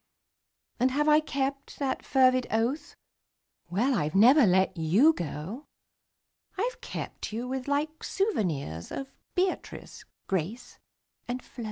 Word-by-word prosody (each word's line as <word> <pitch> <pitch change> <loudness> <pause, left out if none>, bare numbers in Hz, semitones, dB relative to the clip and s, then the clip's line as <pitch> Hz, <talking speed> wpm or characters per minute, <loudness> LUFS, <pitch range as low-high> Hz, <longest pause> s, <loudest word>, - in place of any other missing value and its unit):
And 255 +2 +4
have 295 +3 0
I 305 0 +6
kept 275 -2 -3
that 270 -2 -2
fervid 255 -2 +3
oath? 250 +7 -1 0.7
Well 230 +10 +1
I've 155 -7 -1
never 245 +5 +7
let 190 +1 +3
you 185 - +4
go: 175 - -6 0.9
I've 485 +6 -2
kept - - -6
you 235 +3 -4
with 260 0 -4
like 300 +3 -1
souvenirs 165 - -2
Of 270 0 -5 0.2
Beatrice, 365 0 -2 0.2
Grace 195 +6 -3 0.5
and 245 +1 -4
Flo. - - -16
255 Hz, 125 wpm, -28 LUFS, 195-285 Hz, 0.9 s, never